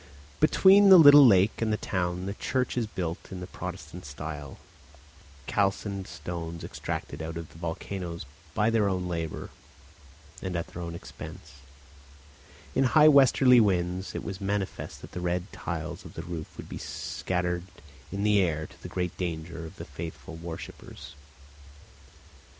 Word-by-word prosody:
Between 195 Hz, +6 st, +6 dB
the 190 Hz, -, +11 dB
little 145 Hz, -3 st, +10 dB
lake 100 Hz, 0 st, +4 dB
and 110 Hz, -1 st, +1 dB
the 105 Hz, -, +1 dB
town 90 Hz, -2 st, -2 dB
the 100 Hz, -, -3 dB
church 125 Hz, +4 st, -1 dB
is 120 Hz, -3 st, 0 dB
built 85 Hz, -5 st, -5 dB
in 95 Hz, -, -5 dB
the 90 Hz, -, -5 dB
Protestant 90 Hz, -2 st, -7 dB
style, 75 Hz, 0 st, -7 dB
of -, -, -14 dB, 0.9 s
calcined 100 Hz, 0 st, -1 dB
stones 85 Hz, -1 st, -6 dB
extracted 70 Hz, -, -5 dB
out 80 Hz, +1 st, -5 dB
of 85 Hz, -2 st, -7 dB
the 80 Hz, -, -15 dB
volcanoes 85 Hz, 0 st, -5 dB, 0.3 s
by 110 Hz, +2 st, +3 dB
their 110 Hz, -3 st, +3 dB
own 90 Hz, -1 st, -1 dB
labour 85 Hz, -3 st, -4 dB, 0.9 s
and 95 Hz, -2 st, -3 dB
at 85 Hz, -, -1 dB
their 90 Hz, -, -9 dB
own 85 Hz, -1 st, -5 dB
expense; 70 Hz, -4 st, -10 dB, 1.2 s
in -, -, +3 dB
high 155 Hz, +4 st, +7 dB
westerly 135 Hz, -3 st, +6 dB
winds 90 Hz, -3 st, +1 dB
it -, -, -3 dB
was 95 Hz, -2 st, -6 dB
manifest 100 Hz, -1 st, -3 dB
that -, -, -11 dB
the 90 Hz, -, -5 dB
red 90 Hz, +2 st, -2 dB
tiles 85 Hz, -2 st, -5 dB
of -, -, -12 dB
the 80 Hz, -, -5 dB
roof 80 Hz, -2 st, -7 dB
would -, -, -8 dB
be -, -, -7 dB
scattered 90 Hz, -1 st, -3 dB, 0.5 s
in 100 Hz, +1 st, -2 dB
the 105 Hz, -1 st, +4 dB
air, 80 Hz, -4 st, 0 dB
to -, -, -16 dB
the -, -, -8 dB
great 90 Hz, -2 st, -2 dB
danger 85 Hz, -2 st, -4 dB
of 85 Hz, -, -13 dB
the -, -, -8 dB
faithful 80 Hz, +2 st, -8 dB
worshippers. 80 Hz, 0 st, -9 dB
90 Hz, 160 wpm, -28 LUFS, 85-100 Hz, 1.2 s, the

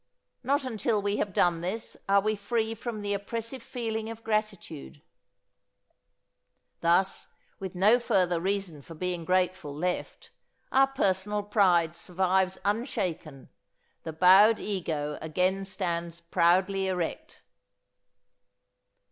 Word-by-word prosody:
Not 280 Hz, +3 st, +1 dB
until 230 Hz, -3 st, 0 dB
we 205 Hz, 0 st, -1 dB
have 200 Hz, -, -1 dB
done 175 Hz, -2 st, +2 dB
this 195 Hz, +6 st, -4 dB
are 200 Hz, 0 st, +5 dB
we 215 Hz, +2 st, 0 dB
free 220 Hz, +2 st, -1 dB
from 225 Hz, -1 st, -6 dB
the 205 Hz, 0 st, -1 dB
oppressive 230 Hz, +5 st, -4 dB
feeling 225 Hz, -2 st, -4 dB
of 225 Hz, 0 st, -9 dB
gratitude. 205 Hz, -9 st, -3 dB, 1.8 s
Thus, 175 Hz, +3 st, +2 dB, 0.3 s
with 190 Hz, -1 st, -6 dB
no 210 Hz, +7 st, +5 dB
further 180 Hz, -7 st, +1 dB
reason 190 Hz, -5 st, -2 dB
for 165 Hz, +4 st, -12 dB
being 175 Hz, 0 st, -3 dB
grateful 185 Hz, -4 st, 0 dB
left, 180 Hz, +4 st, -4 dB, 0.4 s
our 270 Hz, +1 st, +5 dB
personal 205 Hz, -5 st, 0 dB
pride 180 Hz, -5 st, +3 dB
survives 185 Hz, +1 st, 0 dB
unshaken, 200 Hz, -, -3 dB, 0.5 s
the 160 Hz, -, -6 dB
bowed 190 Hz, +7 st, +6 dB
ego 155 Hz, -7 st, -3 dB
again 185 Hz, +5 st, 0 dB
stands 170 Hz, -3 st, -3 dB
proudly 185 Hz, +3 st, +2 dB
erect. 180 Hz, -3 st, -4 dB
190 Hz, 115 wpm, -28 LUFS, 175-215 Hz, 1.8 s, bowed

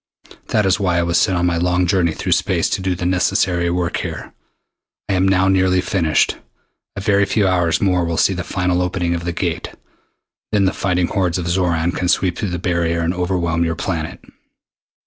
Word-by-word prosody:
That 105 Hz, -2 st, +1 dB
is 95 Hz, +1 st, +2 dB
why 90 Hz, -3 st, +1 dB
I 85 Hz, -, +2 dB
was 85 Hz, 0 st, +1 dB
sent 95 Hz, -, +2 dB
on 85 Hz, -, +1 dB
my 85 Hz, -1 st, +1 dB
long 90 Hz, +1 st, +1 dB
journey 90 Hz, -2 st, +2 dB
through -, -, -4 dB
space -, -, +1 dB
to -, -, -1 dB
do 95 Hz, -1 st, -1 dB
the 90 Hz, -, -4 dB
necessary 90 Hz, -1 st, +1 dB
work 85 Hz, 0 st, -1 dB
here. -, -, -6 dB, 0.7 s
I 100 Hz, -, 0 dB
am 95 Hz, 0 st, +2 dB
now 95 Hz, 0 st, +3 dB
nearly 95 Hz, -1 st, +3 dB
finished. 85 Hz, -4 st, +1 dB, 0.6 s
A -, -, -4 dB
very 100 Hz, 0 st, +3 dB
few 100 Hz, 0 st, +1 dB
hours 90 Hz, -3 st, +1 dB
more 90 Hz, -3 st, +2 dB
will 85 Hz, -1 st, -2 dB
see -, -, +3 dB
the -, -, -4 dB
final 90 Hz, 0 st, -1 dB
opening 90 Hz, -1 st, -1 dB
of 85 Hz, 0 st, -4 dB
the 85 Hz, -, -1 dB
Gate. 85 Hz, -, -3 dB, 0.8 s
Then 105 Hz, -2 st, +2 dB
the 95 Hz, -, +1 dB
fighting 90 Hz, -2 st, 0 dB
hordes 95 Hz, -4 st, 0 dB
of 90 Hz, -2 st, -3 dB
Xoran 85 Hz, -1 st, +1 dB
can 90 Hz, +1 st, -2 dB
sweep 90 Hz, -1 st, +1 dB
through 100 Hz, -, -2 dB
the 90 Hz, -, -3 dB
barrier 85 Hz, -1 st, 0 dB
and 85 Hz, +1 st, 0 dB
overwhelm 90 Hz, -2 st, -1 dB
your 80 Hz, -1 st, -1 dB
planet. 80 Hz, -2 st, -4 dB
90 Hz, 205 wpm, -19 LUFS, 85-95 Hz, 0.8 s, now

